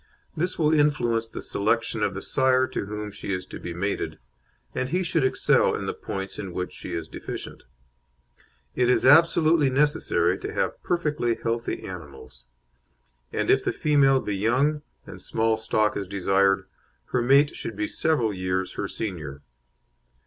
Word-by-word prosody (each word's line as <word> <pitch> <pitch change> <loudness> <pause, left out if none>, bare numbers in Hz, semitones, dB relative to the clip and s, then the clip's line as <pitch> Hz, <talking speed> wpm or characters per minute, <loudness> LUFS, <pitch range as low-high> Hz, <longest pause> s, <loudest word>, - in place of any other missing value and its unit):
This 180 +4 -1
will 155 -1 +3
influence 120 -7 +2
the - - -7
selection 115 +2 0
of 100 -2 0
the 95 - -5
sire 130 -1 +3
to 100 - -4
whom 105 0 -5
she 100 - -6
is 90 -1 -2
to - - -9
be 85 - -6
mated, 100 +4 -3 0.6
and 130 - -2
he 180 +4 0
should 165 -3 +1
excel 130 - +3
in - - -4
the - - -2
points 95 0 -6
in 95 -3 -6
which 90 0 -4
she - - -6
is 80 -1 -4
deficient. - - -7 1.1
It 125 -1 +2
is 125 - +3
absolutely 160 0 +5
necessary 145 +3 +1
to - - -5
have - - -1
perfectly 150 -9 0
healthy 115 +1 -3
animals, 70 -8 -10 0.9
and - - +1
if - - +3
the - - 0
female 140 -3 +3
be 105 - -3
young, 130 +9 +1 0.2
and - - -10
small 110 0 +1
stock 110 -1 0
is 100 -2 -3
desired, 95 0 +2 0.5
her 125 - +2
mate 140 +4 +4
should 110 - -5
be 105 +1 -1
several 125 -9 0
years 95 0 -2
her - - -3
senior. 75 -9 -5
115 Hz, 165 wpm, -25 LUFS, 95-140 Hz, 1.1 s, absolutely